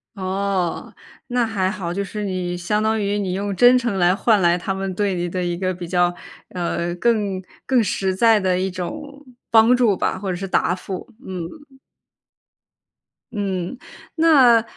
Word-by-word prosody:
哦， 190 -2 -2 0.3
那 245 -2 +1
还 195 -4 -1
好， 180 -4 -4
就 200 - -2
是 205 +2 -5
你 180 -2 -2
相 210 +5 -1
当 220 0 +1
于 205 0 0
你 185 -2 -2
用 200 +1 -2
真 245 +6 +6
诚 235 -5 -1
来 180 0 +3
换 215 -1 +3
来 175 0 +3
他 190 +2 -3
们 190 -1 -3
对 200 -1 0
你 175 -1 -2
的 180 0 -2
一 175 -1 -2
个 185 0 -1
比 175 -1 -8
较， 175 -1 +2 0.4
呃， 175 -1 -2
更 205 -3 0 0.2
更 255 -4 +3
实 190 -1 -1
在 225 +2 +5
的 185 -2 +1
一 190 0 -1
种 280 - -7 0.3
帮 230 +2 +6
助 235 -6 +3
吧， - - -1
或 195 -1 -5
者 - - -2
是 195 +2 -5
答 180 - +1
复。 185 0 -6 0.2
嗯。 265 - -8 1.5
嗯， 195 0 -3 0.4
那 270 -9 +5
195 Hz, 185 characters per minute, -21 LUFS, 180-225 Hz, 1.5 s, 真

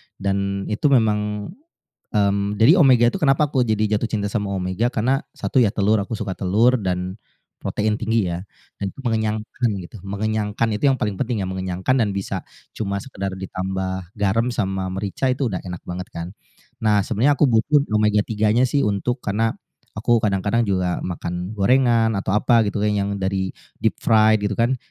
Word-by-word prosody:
dan 100 0 -1
itu 110 +7 +1
memang, 105 -3 +1 0.6
mmm, 100 -1 +1
jadi 140 - +6
omega 125 -5 +6
tuh - - -3
kenapa 140 +1 +4
aku 130 - +2
jadi 110 -1 +1
jatuh 115 +2 -2
cinta 105 -2 -1
sama 105 -2 -1
omega 95 +5 -1
karena 130 +5 +1
satu 130 - 0
ya 110 - +3
telur, 105 +1 +2
aku 100 - -7
suka 100 -3 -3
telur 110 +7 +3
dan 90 +1 -3 0.4
protein 105 0 0
tinggi 115 -3 +1
ya 85 +2 -4 0.4
dan - - -1
itu - - -15
mengenyangkan 110 0 -1 0.2
gitu. 110 - -11
Mengenyangkan 105 +2 -1
itu 105 - -6
yang 130 - 0
paling 105 -2 -1
penting 120 -6 -1
ya, - - -3
mengenyangkan 95 +5 -1
dan 110 -3 +2
bisa 100 - -3 0.3
cuma 100 -2 -2
sekedar 100 -8 -5
ditambah 95 -1 -4
garam 105 +3 +1
sama 95 -4 -1
merica 100 +7 -2
itu 130 +2 -1
udah 90 - -2
enak 90 -2 -7
banget 90 +1 -5
kan. 85 0 -5 0.6
Nah, 105 -2 +4
sebenarnya 120 +8 +2
aku - - +6
butuh 140 +6 +3
omega-3 105 0 +2
nya 125 - +4
sih 140 - +2
untuk 105 +5 -1
karena, 110 +2 0 0.4
aku 120 +2 +3
kadang-kadang 100 +3 +1
juga 95 -3 0
makan 90 +1 -4
gorengan 115 +1 +3
atau 95 - -3
apa 115 +2 +4
gitu 100 +1 -2
yang 100 -1 0
dari 95 0 -1 0.3
deep - - +1
fried 110 -1 +4
gitu 105 0 -1
kan. 120 +4 +2
105 Hz, 175 wpm, -22 LUFS, 95-115 Hz, 0.6 s, jadi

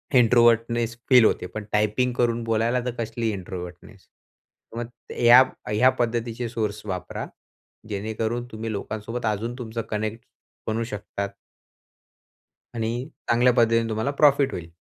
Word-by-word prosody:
Introvertness 115 -1 +4
feel 125 -4 +7
होते 90 - +1
पण 110 - -3
typing 105 +4 +1
करून 120 -1 0
बोलायला 115 +2 +1
तर 125 - -1
कसली 115 0 -2
इंट्रोव्हर्टनेस. 90 -2 -8
तर 115 - -20
मग 120 0 -4 0.3
ह्या 120 +2 +8 0.3
ह्या 110 +5 +5
पद्धतीचे 120 0 -1
सोर्स 105 -3 -3
वापरा, 95 -3 -4 0.6
जेणेकरून 110 +3 -2
तुम्ही 110 +1 -5
लोकांसोबत 110 +3 -4
अजून 110 +3 -1
तुमचं 115 -1 -4
कनेक्ट 110 +1 -3 0.4
बनवू 110 +1 0
शकतात. 100 -2 -5 1.5
आणि 115 -1 -1 0.4
चांगल्या 120 +1 +4
पद्धतीने 115 -1 +3
तुम्हाला 110 +5 -1
प्रॉफिट 140 -1 +4
होईल. 85 -1 -6
115 Hz, 125 wpm, -24 LUFS, 110-120 Hz, 1.5 s, ह्या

